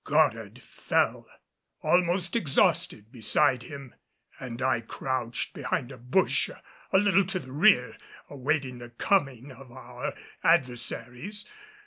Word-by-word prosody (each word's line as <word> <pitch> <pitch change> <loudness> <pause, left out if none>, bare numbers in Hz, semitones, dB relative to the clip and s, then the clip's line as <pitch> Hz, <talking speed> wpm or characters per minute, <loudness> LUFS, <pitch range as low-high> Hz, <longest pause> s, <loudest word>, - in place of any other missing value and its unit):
Goddard 115 -8 +1
fell - - -1 0.6
almost 175 +1 +2
exhausted 135 - +1
beside 125 +2 +2
him 140 0 -10 0.5
and 120 -2 -7
I 130 -2 +1
crouched 120 0 -3
behind 125 - -3
a 135 - -10
bush 125 +11 +2 0.4
a - - +5
little 195 -1 +4
to 190 0 -2
the 130 -8 -8
rear, 145 -3 +4 0.3
awaiting 135 -2 -2
the 120 0 -9
coming 135 - 0
of 130 0 -14
our 125 0 -7 0.3
adversaries. 135 - 0
130 Hz, 115 wpm, -27 LUFS, 125-170 Hz, 0.6 s, a